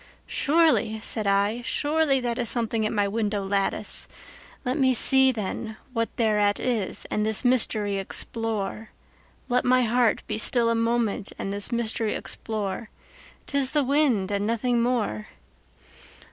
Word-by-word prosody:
"Surely," 300 -8 +1
said 215 -3 -2
I, 200 +4 +1
"surely 290 +2 +1
that 240 0 -3
is 235 - +2
something 225 -2 0
at - - -4
my 205 -2 0
window 205 -1 -2
lattice; 195 0 +1 0.6
Let 250 +1 -1
me 260 -4 +2
see, 265 +2 +5
then, 220 0 -5 0.2
what 230 -1 -1
thereat 210 -3 +1
is, 230 -7 -2
and 210 - 0
this 220 +3 +2
mystery 215 -5 +3
explore; 215 +1 -3 0.6
Let 250 0 +1
my 255 0 +3
heart 235 0 +1
be 215 0 -3
still 230 0 +3
a - - +2
moment 230 -3 -1
and 195 - -4
this 200 +3 +1
mystery 225 -2 -1
explore:'T 215 +5 -7
is 275 -2 +2
the 295 -2 +2
wind 260 -8 +1
and 200 +1 -1
nothing 235 +1 0
more." 230 - -1
230 Hz, 145 wpm, -25 LUFS, 210-250 Hz, 0.6 s, see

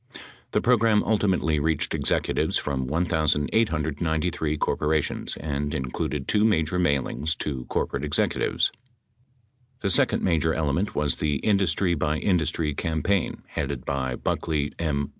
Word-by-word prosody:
The - - +2
program 115 -3 +3
ultimately 95 -8 +1
reached 80 0 0
executives - - +1
from 65 -3 -2
1893 80 - 0
corporations 75 0 -1
and 75 -1 -3
included 65 +2 -3
two 105 -1 +2
major 90 -5 +2
mailings 70 -1 0
to 65 -4 -3
corporate 70 - -2
executives. 75 0 +1 1.1
The 100 - +1
second - - +3
major 80 -2 +2
element 80 +6 -1
was 75 -2 +1
the 75 -1 0
industry 95 -3 +2
by 75 -1 0
industry 80 -4 0
campaign 80 +5 -1
headed 70 -2 -3
by 65 -2 -1
Buckley 75 +2 -1
M. 70 -4 -1
80 Hz, 120 wpm, -25 LUFS, 70-90 Hz, 1.1 s, program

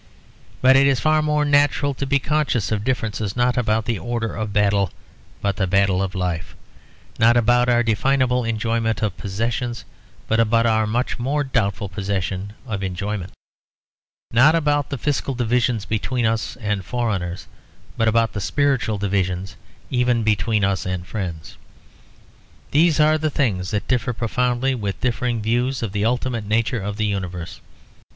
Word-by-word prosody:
But 130 +1 +7
it 135 +1 +6
is 135 -3 +2
far 155 0 +3
more 150 -1 +1
natural 145 0 +3
to 135 +1 -4
be 140 +1 +3
conscious 140 - 0
of 105 -2 0
a - - -7
difference, 110 -5 -2
not 125 0 +2
about 110 -3 +1
the 115 -5 -1
order 115 +4 -3
of 110 -2 -3
battle 100 -2 +2 0.5
but 100 -1 0
the 95 - 0
battle 95 0 +2
of 95 -1 -3
life; 90 -3 -3 0.6
not 115 +1 +5
about 120 +1 +3
our 120 0 +3
definable 125 +2 +1
enjoyment 115 -1 -1
of 105 -4 -1
possessions, 115 +4 -3 0.4
but 110 - +1
about 115 +1 +3
our 110 -1 +2
much 120 +4 -1
more 140 +4 0
doubtful 100 -7 -1
possession 95 0 -3
of 105 -6 -4
enjoyment; 95 0 -3 1.0
not 140 +8 +5
about 145 -3 +1
the 140 - -3
fiscal 140 +1 -1
divisions 120 -2 0
between 115 +3 -1
us 110 0 -1
and 105 -4 -2
foreigners 95 -4 -2 0.5
but 115 - +1
about 115 0 +2
the 105 - -3
spiritual 135 -3 +1
divisions 95 -1 -1 0.4
even 125 -2 +2
between 110 0 +1
us 95 -1 +1
and 90 -1 -3
friends. 90 -6 -6 1.1
These 160 +1 +3
are 155 +1 +4
the 155 0 0
things 105 -11 0
that 105 -2 -2
differ 125 -1 0
profoundly 125 +3 0
with 100 -6 -3
differing 120 -2 -1
views 120 +3 0
of 110 - -2
the 105 +1 -1
ultimate 120 -2 -1
nature 115 +2 0
of 100 +1 -4
the 110 - 0
universe. 90 -3 -4
115 Hz, 160 wpm, -21 LUFS, 100-125 Hz, 1.1 s, But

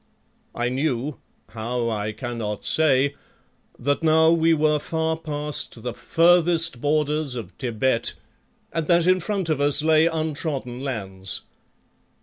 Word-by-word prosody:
I 120 0 -1
knew, 135 +1 -2 0.3
how 115 +2 -3
I 105 0 -2
cannot 110 -2 -5
say, 140 -3 +3 0.6
that 145 +5 -1
now 160 0 +4
we 165 0 +3
were 150 -1 +2
far 160 +1 -1
past 150 -6 -5
the 125 -1 -3
furthest 165 -3 +3
borders 150 -2 0
of 110 -7 -6
Thibet 120 -1 0 0.6
and 165 -2 -2
that 170 -1 +4
in 185 +1 +4
front 195 0 -2
of 155 -3 0
us 145 +1 +5
lay 160 0 +4
untrodden 155 -6 -3
lands. 95 -8 -3
145 Hz, 130 wpm, -23 LUFS, 120-160 Hz, 0.6 s, us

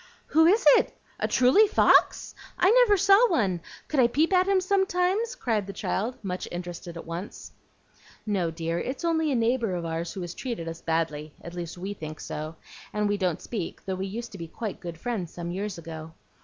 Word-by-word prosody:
"Who 320 +1 +5
is 405 +2 +4
it? - - +3 0.2
A - - 0
truly 260 +13 +5
fox? 405 - +4 0.2
I 365 +3 +5
never 475 -4 +6
saw 400 +5 +6
one. 195 - +1 0.3
Could 300 - 0
I 245 - +6
peep 310 +9 +1
at 370 0 +4
him 395 -1 +4
sometimes?" 385 +4 +1
cried 215 -5 -1
the 200 - -6
child, 225 +7 -2
much 185 -2 -4
interested 175 -1 -6
at - - -8
once. 170 +4 -7 0.7
"No, 195 -6 0
dear; 165 +1 -3
it's 270 - -4
only 320 -2 +1
a - - +1
neighbor 230 -4 +1
of 170 -1 -3
ours 165 +1 -3
who 190 - -6
has 175 -1 -5
treated 230 -10 -5
us 165 0 -6
badly, 155 -2 -2
at 170 - -9
least 175 -1 -6
we 190 +3 -4
think 155 -5 -8
so, 155 +2 -5 0.4
and 210 0 0
we 205 0 +1
don't 180 -4 -1
speak, 205 -8 -5
though 190 - -2
we 190 +1 -3
used 230 +4 -6
to 195 - -10
be 165 - -6 0.3
good 170 -2 -7
friends 185 -3 -3
some 175 0 -5
years 195 +1 -4
ago. 160 -1 -8
200 Hz, 200 wpm, -27 LUFS, -, 0.7 s, never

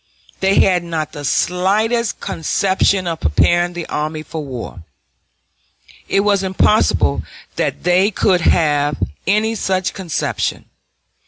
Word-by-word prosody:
They 195 +1 +3
had 180 -2 +2
not 160 -3 -3
the 145 -2 -8
slightest 205 - 0
conception 190 +3 0
of 165 -2 -3
preparing 175 - +2
the 175 -1 -5
army 155 +1 -3
for 155 0 -6
war. 120 - -7 1.2
It 195 - +2
was 200 -1 +2
impossible 185 - +2 0.3
that - - -2
they 180 +3 +3
could 185 -3 +1
have 145 -3 +2 0.3
any 215 +3 +2
such 190 -3 -1
conception. 180 -6 -3
180 Hz, 115 wpm, -18 LUFS, 155-195 Hz, 1.2 s, They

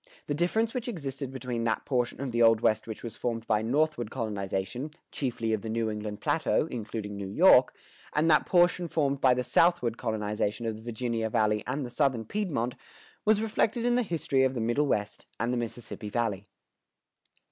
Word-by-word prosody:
The 145 - -2
difference 220 +9 +1
which 250 -2 -3
existed 140 - -4
between 125 -2 -4
that 110 - 0
portion 125 -3 -1
of 135 -2 -3
the 120 0 0
Old 115 -1 +6
West 110 0 +2
which 110 - -7
was 115 -2 -6
formed 115 -2 -3
by 110 -1 +2
the 110 - -3
northward 150 -4 +1
colonization, 105 +3 -3 0.2
chiefly 115 -4 -2
of 110 - -1
the 110 - -5
New 110 0 0
England 105 0 -5
Plateau 160 -1 +1
(including 110 -3 -5
New 100 -1 -5
York), 95 - +5 0.4
and 150 +2 +2
that 155 -2 +4
portion 175 0 +3
formed 140 -4 0
by 130 -2 +5
the 125 - -1
southward 125 -2 +2
colonization 105 -1 -2
of 110 -1 -1
the - - -12
Virginia 115 -1 -2
Valley 105 0 +1
and 135 +2 -2
the 120 - -8
Southern 130 -5 +1
Piedmont 140 - -2 0.5
was 215 0 +4
reflected 225 +2 0
in 245 - +3
the 250 - +3
history 160 - 0
of 130 0 +1
the - - -2
Middle 120 +6 +1
West 105 -5 -2
and 115 +3 0
the - - 0
Mississippi 115 -2 -5
Valley. 105 -3 -2
120 Hz, 190 wpm, -28 LUFS, 110-150 Hz, 0.5 s, Old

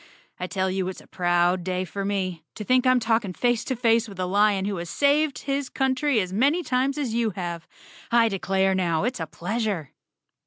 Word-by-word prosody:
I 180 - -3
tell 190 0 -1
you 190 -1 -1
it's 185 - -5
a - - -16
proud 175 0 +1
day 185 0 -2
for 195 +3 -5
me. 190 -4 -2
To 215 - -5
think 255 +3 +3
I'm 255 0 +5
talking 225 -4 0
face 240 +3 +1
to 260 - -1
face 230 -1 +2
with 195 -2 -11
a 185 - 0
lion 200 +1 +2
who 200 -1 -2
has 170 0 -5
saved 285 - +2
his 275 -1 -2
country 265 -1 +1
as 185 -2 -2
many 285 - +2
times 265 0 0
as 265 -6 -2
you 230 -1 +1
have. 170 -3 -5 0.4
I 235 -1 +5
declare 195 -1 +1
now, 175 -3 0
it's 245 -1 -1
a 165 - -3
pleasure." 200 - -3
205 Hz, 205 wpm, -25 LUFS, 185-250 Hz, 0.4 s, I'm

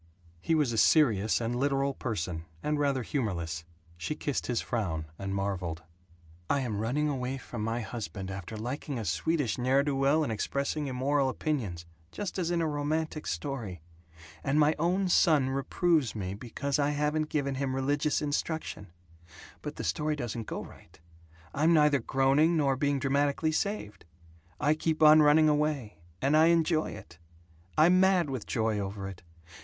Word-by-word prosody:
He 165 - +1
was 150 -6 +2
a 115 - +1
serious 110 -10 +4
and 120 +1 -2
literal 140 +1 +1
person, 90 -10 -4 0.2
and 150 0 0
rather 140 -3 +1
humorless. 85 - -3 0.3
She 85 - -3
kissed 145 -3 -3
his 120 -2 0
frown, 95 -10 -2
and 95 0 -3
marveled: 90 -5 -3 0.7
"I 140 - +2
am 110 -6 -2
running 130 +8 0
away 135 -2 -2
from 120 -4 -6
my 115 +2 -1
husband, 100 -4 -6
after 95 +3 -6
liking 130 +4 -4
a 110 - -4
Swedish 115 - 0
ne'er 130 +3 +3
do 145 -1 -1
well 140 +4 +3
and 140 - -2
expressing 140 +7 -2
immoral 135 +1 +1
opinions, 115 - -3 0.3
just 200 -2 -4
as 170 -2 0
in 175 -1 +1
a - - +1
romantic 155 +1 -2
story. 95 - -4 0.6
And 140 +2 +1
my 150 +1 +5
own 185 +4 +1
son 150 -6 +4
reproves 140 0 +1
me 95 -3 -3
because 130 +6 -3
I 145 0 +2
haven't 150 +1 0
given 140 -2 -1
him 135 -1 -2
religious 145 +3 0
instruction. 150 -7 -3 0.7
But - - -6
the - - -5
story 150 - 0
doesn't 120 -4 -5
go - - -4
right. - - -16 0.5
I'm 160 +4 +3
neither 150 -2 +4
groaning 140 +6 +3
nor 140 -3 +2
being 140 +1 +1
dramatically 140 +3 +1
saved. 160 - -3 0.5
I 150 - +3
keep 155 0 0
on 155 0 +8
running 150 +1 +6
away, 150 - 0 0.2
and 140 +3 +3
I 160 +1 +6
enjoy 165 -1 +2
it. 90 - -11 0.6
I'm 175 +4 +6
mad 185 -5 +3
with 125 -6 -5
joy 110 -2 0
over 100 0 -4
it. 95 -2 -9
135 Hz, 165 wpm, -29 LUFS, 110-150 Hz, 0.7 s, on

